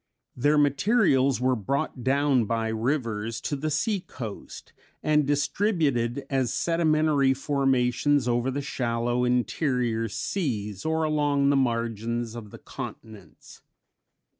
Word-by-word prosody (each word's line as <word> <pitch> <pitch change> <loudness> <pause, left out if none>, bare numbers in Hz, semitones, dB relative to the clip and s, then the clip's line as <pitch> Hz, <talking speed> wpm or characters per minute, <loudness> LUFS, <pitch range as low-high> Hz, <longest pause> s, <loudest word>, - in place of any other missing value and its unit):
Their 145 +4 +2
materials 140 - +3
were 130 0 +2
brought 135 +4 -3
down 135 -2 +2
by 115 +1 -1
rivers 115 -2 -2
to 145 - -2
the 150 +3 -2
sea 200 +8 0
coast, 115 - -9 0.3
and 150 -2 +2
distributed 145 - 0
as 135 -3 0
sedimentary 155 -5 +2
formations 135 0 +1
over 120 +1 +1
the 140 +2 -3
shallow 120 -2 -1
interior 125 -2 0
seas 105 - -3
or 160 0 0
along 145 -2 +2
the - - +2
margins 115 -2 -1
of 115 -3 -8
the - - -11
continents. 100 -8 -10
130 Hz, 115 wpm, -26 LUFS, 115-145 Hz, 0.3 s, materials